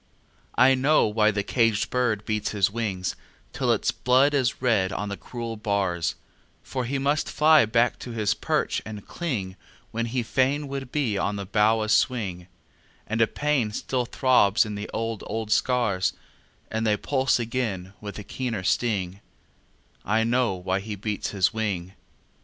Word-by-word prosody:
I 130 +2 +6
know 135 +4 +3
why 105 0 +3
the 105 -1 -1
caged 115 -1 +1
bird 115 -5 0
beats 105 -1 -2
his 100 -2 +2
wing 100 -5 -3 0.5
Till - - +1
its - - +1
blood 130 +4 +3
is 130 -4 +1
red 110 -7 +2
on 100 +1 -3
the 100 - -3
cruel 115 +1 -6
bars; 100 -5 -1 0.5
For 130 -2 -3
he 135 +4 -1
must 145 +2 0
fly 155 -5 +5
back 115 +2 +2
to - - -8
his 110 -3 0
perch - - -1
and 105 -1 -8
cling 105 - -4 0.3
When 115 +1 -2
he 120 +1 -1
fain 135 +5 +1
would 135 -2 -5
be 120 -9 0
on 100 - -1
the 100 -1 -4
bough 110 +3 +2
a - - -3
swing; 105 -6 +1 0.6
And 110 +1 -1
a 115 - +5
pain 145 -6 0
still 125 +2 -1
throbs 120 -3 +3
in 105 - -5
the 105 0 -5
old, 115 -1 -3
old 110 0 -4
scars 115 -7 +2 0.6
And 110 0 -1
they 105 -1 +3
pulse 135 +3 +1
again 110 -6 -3
with 105 -1 -7
a 105 - -7
keener 115 -4 -4
sting 95 -3 0 0.8
I 110 +3 +2
know 120 -3 +1
why 95 +1 -1
he 105 +1 -5
beats 105 +1 -3
his 100 +1 +1
wing! 100 -5 -2
110 Hz, 170 wpm, -25 LUFS, 100-125 Hz, 0.8 s, I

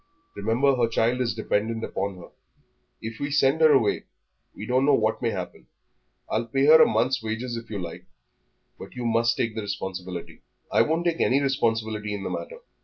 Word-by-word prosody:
"Remember 115 +7 +1
her 120 -1 +3
child 115 +2 +1
is 115 -3 -1
dependent 110 +1 -1
upon 100 -1 -3
her; 90 - -12 0.7
if 115 0 -6
we 145 - -2
send 145 +2 +2
her 155 -1 +7
away 125 -7 +2 0.5
we 105 - -7
don't 125 +3 +2
know 140 0 +5
what 110 -2 0
may 120 - +1
happen. 95 -5 -6 0.6
I'll 115 +2 -1
pay 135 +3 +1
her 160 +2 +8
a - - +7
month's 120 +4 +1
wages 110 +2 -4
if 115 0 -8
you 105 - -4
like, 85 -3 -7 0.7
but 95 - -11
you 125 -1 -4
must 115 +1 +2
take 115 -2 -1
the 110 - -4
responsibility." 95 -3 -6 0.3
"I - - +4
won't 165 +3 0
take 170 -1 0
any 135 - +3
responsibility 110 -6 -1
in 100 - -6
the - - -4
matter. 485 0 -6
115 Hz, 190 wpm, -25 LUFS, 105-135 Hz, 0.7 s, her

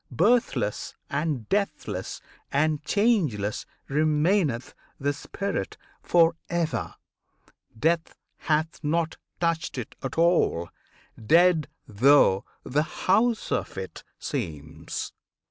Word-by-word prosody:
Birthless 200 - +1 0.2
and 140 -6 -1
deathless 150 - -2 0.3
and 150 +1 +1
changeless 155 - +1 0.2
remaineth 150 - +1 0.3
the 145 +1 0
spirit 200 +7 -4 0.2
for 165 -1 +4
ever; 170 -2 -1 0.8
Death 165 +6 +1 0.2
hath 160 +1 -1
not 165 +2 0 0.2
touched 165 -4 -1
it 125 - -5
at 135 - -5
all, 165 - +3 0.5
dead 165 +3 +5 0.2
though 110 -3 +5 0.2
the 145 +4 +1 0.2
house 220 +4 +2
of - - -2
it 95 -1 -6
seems! 75 -2 -5
155 Hz, 95 wpm, -26 LUFS, 125-170 Hz, 0.8 s, dead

